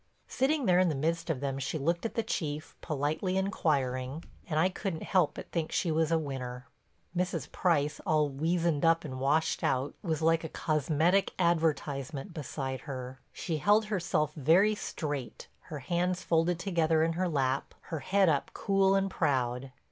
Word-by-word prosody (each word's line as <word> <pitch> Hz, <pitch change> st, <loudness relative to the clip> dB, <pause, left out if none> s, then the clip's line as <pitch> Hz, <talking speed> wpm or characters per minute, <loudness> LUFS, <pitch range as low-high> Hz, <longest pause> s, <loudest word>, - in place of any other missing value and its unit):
Sitting 275 Hz, +1 st, +1 dB
there 180 Hz, -2 st, +5 dB
in 185 Hz, -1 st, +4 dB
the 155 Hz, -, -1 dB
midst 165 Hz, +4 st, -1 dB
of 145 Hz, -5 st, -1 dB
them, 135 Hz, -1 st, -2 dB
she 135 Hz, +4 st, -2 dB
looked 170 Hz, +8 st, 0 dB
at -, -, -13 dB
the 230 Hz, -, +1 dB
Chief, 150 Hz, -5 st, -3 dB
politely 155 Hz, +5 st, -1 dB
inquiring, 140 Hz, -6 st, -1 dB, 0.3 s
and 155 Hz, -1 st, +1 dB
I 175 Hz, -, +5 dB
couldn't 185 Hz, -3 st, -4 dB
help 180 Hz, -5 st, +2 dB
but -, -, -9 dB
think 165 Hz, -2 st, -2 dB
she 170 Hz, -, 0 dB
was 160 Hz, 0 st, +1 dB
a 165 Hz, -, +4 dB
winner. 130 Hz, -4 st, -5 dB, 0.5 s
Mrs. 180 Hz, +1 st, -2 dB
Price, 150 Hz, -5 st, +1 dB
all 155 Hz, -1 st, +2 dB
weazened 160 Hz, +2 st, 0 dB
up 165 Hz, 0 st, +3 dB
and 130 Hz, -3 st, -5 dB
washed 150 Hz, +4 st, +1 dB
out, 135 Hz, +2 st, 0 dB
was 160 Hz, -3 st, -2 dB
like 165 Hz, 0 st, +3 dB
a 160 Hz, -, -4 dB
cosmetic 160 Hz, +6 st, +1 dB
advertisement 155 Hz, -3 st, 0 dB
beside 135 Hz, -4 st, -4 dB
her. 130 Hz, 0 st, -6 dB
She 165 Hz, -3 st, -3 dB
held 205 Hz, +8 st, +4 dB
herself 180 Hz, -7 st, 0 dB
very 170 Hz, +9 st, +4 dB
straight, 145 Hz, -, -5 dB, 0.2 s
her 150 Hz, -, -5 dB
hands 180 Hz, +5 st, -1 dB
folded 165 Hz, +1 st, +2 dB
together 165 Hz, -3 st, +2 dB
in 165 Hz, 0 st, +1 dB
her 180 Hz, +2 st, 0 dB
lap, 135 Hz, -3 st, -1 dB, 0.2 s
her 160 Hz, -, -2 dB
head 195 Hz, +5 st, +2 dB
up 145 Hz, -4 st, +1 dB
cool 195 Hz, -1 st, +3 dB
and 195 Hz, 0 st, +2 dB
proud. 130 Hz, -7 st, -1 dB
160 Hz, 170 wpm, -30 LUFS, 140-180 Hz, 0.5 s, there